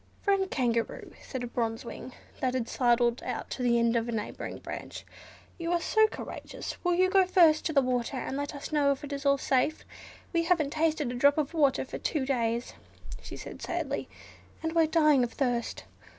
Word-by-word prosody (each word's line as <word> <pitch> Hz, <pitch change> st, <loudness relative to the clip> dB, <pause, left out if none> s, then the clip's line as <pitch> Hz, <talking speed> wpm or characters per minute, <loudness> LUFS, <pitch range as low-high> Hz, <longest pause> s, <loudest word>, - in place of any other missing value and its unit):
"Friend 390 Hz, -2 st, +2 dB
Kangaroo," 235 Hz, -3 st, -1 dB
said 260 Hz, -2 st, -5 dB
a -, -, -3 dB
Bronze 230 Hz, -1 st, -2 dB
Wing 255 Hz, -, -8 dB, 0.3 s
that 255 Hz, -1 st, 0 dB
had 240 Hz, -3 st, -1 dB
sidled 240 Hz, -1 st, +2 dB
out -, -, -5 dB
to -, -, -4 dB
the 240 Hz, -1 st, +3 dB
end 235 Hz, 0 st, +2 dB
of 230 Hz, 0 st, 0 dB
a -, -, -1 dB
neighbouring 215 Hz, -2 st, -4 dB
branch, -, -, -7 dB, 0.5 s
"you 335 Hz, 0 st, -2 dB
are 350 Hz, -, +2 dB
so 435 Hz, +6 st, +4 dB
courageous, -, -, -7 dB
will 355 Hz, -1 st, +2 dB
you 370 Hz, +1 st, +4 dB
go 380 Hz, -1 st, +4 dB
first 335 Hz, -4 st, +5 dB
to -, -, -2 dB
the 280 Hz, -3 st, +4 dB
water, 250 Hz, +1 st, -1 dB
and 255 Hz, -, -3 dB
let 285 Hz, +1 st, -3 dB
us 285 Hz, -, -7 dB
know 290 Hz, -2 st, +3 dB
if 275 Hz, -, -3 dB
it 290 Hz, 0 st, -5 dB
is 280 Hz, 0 st, -2 dB
all 280 Hz, 0 st, +5 dB
safe? 275 Hz, +3 st, 0 dB, 0.5 s
We 335 Hz, -1 st, +2 dB
haven't 325 Hz, -5 st, +2 dB
tasted 310 Hz, -4 st, 0 dB
a -, -, -4 dB
drop 280 Hz, +4 st, +4 dB
of 305 Hz, 0 st, -1 dB
water 285 Hz, -5 st, +2 dB
for -, -, -7 dB
two 290 Hz, -5 st, -1 dB
days," 235 Hz, -3 st, -1 dB, 0.5 s
she -, -, -8 dB
said, -, -, -9 dB
sadly, -, -, -3 dB, 0.5 s
"and 320 Hz, 0 st, -1 dB
we're 330 Hz, -1 st, +4 dB
dying 305 Hz, -5 st, +4 dB
of 235 Hz, -, -3 dB
thirst. 245 Hz, -4 st, -1 dB
280 Hz, 205 wpm, -29 LUFS, 245-320 Hz, 0.5 s, first